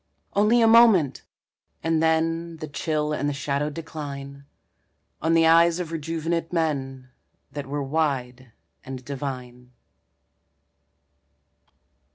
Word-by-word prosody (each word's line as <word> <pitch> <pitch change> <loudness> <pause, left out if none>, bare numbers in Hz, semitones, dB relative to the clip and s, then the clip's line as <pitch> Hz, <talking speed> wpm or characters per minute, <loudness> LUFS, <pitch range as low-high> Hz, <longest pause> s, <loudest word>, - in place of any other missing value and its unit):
Only 220 +4 +4
a - - +5
moment! 220 - +5 0.6
and 165 -1 +1
then 165 +1 0
The 155 -1 -6
chill 150 +1 -2
and 145 -1 -1
the - - -2
shadow 140 +1 -1
decline, 140 -3 -8 0.8
On 165 +2 +2
the 165 0 +5
eyes 165 +1 +5
of 170 -2 -4
rejuvenate 165 +1 -3
men 135 -6 -2 0.4
That 140 -1 -6
were 145 +1 -3
wide 130 -4 -2 0.3
and 130 -1 -8
divine. 125 -3 -7
150 Hz, 110 wpm, -24 LUFS, 140-165 Hz, 0.8 s, a